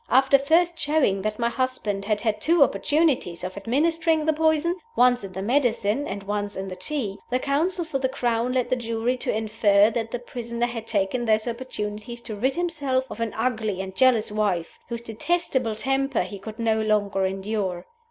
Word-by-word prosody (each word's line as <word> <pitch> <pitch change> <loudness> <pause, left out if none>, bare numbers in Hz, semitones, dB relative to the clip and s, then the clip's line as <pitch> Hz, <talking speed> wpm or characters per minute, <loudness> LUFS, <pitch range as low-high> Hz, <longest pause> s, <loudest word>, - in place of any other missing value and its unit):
After 270 +2 +5
first 330 +4 +2
showing 285 -10 +2
that 215 +1 -2
my 235 - +1
husband 235 -6 -2
had 210 -1 0
had 215 -2 -1
two 330 +2 +5
opportunities 270 - +1
of 185 0 -5
administering 320 +8 +1
the 315 - +3
poison 315 +2 +2 0.2
once 245 -2 +4
in 195 - -7
the 190 +1 -5
medicine 240 +1 +1
and 200 0 -5
once 205 0 -3
in 190 0 -4
the 185 - -6
tea 225 -6 -4
the 250 - +2
counsel 325 +7 0
for 300 -4 -2
the 260 -1 0
Crown 240 -1 0
led 250 -2 0
the - - +4
jury 230 0 -1
to - - -2
infer 215 -1 +3
that 225 0 -2
the 245 - -3
prisoner 235 -1 -3
had 230 -2 -5
taken 215 +3 0
those 220 +1 +2
opportunities 235 -1 -5
to 220 - -6
rid 260 +6 0
himself 285 -7 0
of - - -7
an 230 -2 -2
ugly 220 -6 -1
and 190 0 -5
jealous 240 -3 +3
wife, 200 -6 -1
whose 235 0 -4
detestable 240 -1 -1
temper 270 0 0
he 195 +2 -8
could 215 +3 -8
no 225 -2 +1
longer 205 -3 +1
endure. 190 -2 -3
235 Hz, 190 wpm, -25 LUFS, 210-270 Hz, 0.2 s, After